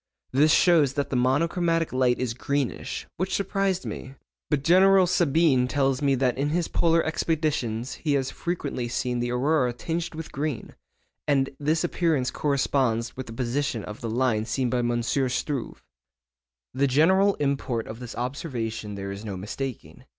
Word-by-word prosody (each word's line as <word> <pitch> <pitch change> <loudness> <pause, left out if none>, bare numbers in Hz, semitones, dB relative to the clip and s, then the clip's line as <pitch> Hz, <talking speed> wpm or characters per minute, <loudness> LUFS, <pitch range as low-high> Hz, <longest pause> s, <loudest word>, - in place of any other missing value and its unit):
This 150 +4 +4
shows 160 -6 +4
that 140 0 -2
the - - 0
monochromatic 165 +6 +1
light 125 -1 +2
is 125 -3 -2
greenish, 140 +2 -3
which 185 +2 -1
surprised 195 -1 0
me; 135 +1 -7 0.3
but 145 -2 0
General 190 +3 +6
Sabine 160 -6 +3
tells 135 0 +1
me 140 -2 +3
that 130 -1 0
in 145 +1 +1
his 170 +2 0
polar 165 -1 +2
expeditions 150 -7 -1
he 150 -3 +1
has 135 -2 0
frequently 145 -8 -3
seen 125 0 -2
the 120 0 -1
aurora 130 0 +1
tinged 165 +6 -4
with 160 0 -7
green, 145 -3 -4 0.5
and 135 -2 +2
this 155 +3 +1
appearance 165 -7 0
corresponds 130 -5 0
with 130 - -6
the 115 - -8
position 125 -1 -2
of 105 - -8
the 115 - -3
line 115 -2 +1
seen 125 +2 -1
by 125 - +1
M. 120 0 0
Struve.' 130 +1 -2 0.9
The 140 +2 +2
general 190 +9 +4
import 135 -5 -1
of 110 - -8
this 125 -2 -8
observation 115 -5 -4
there 100 0 -5
is 100 +2 -7
no 100 -4 -5
mistaking. 120 +6 -6
135 Hz, 160 wpm, -26 LUFS, 120-160 Hz, 0.9 s, General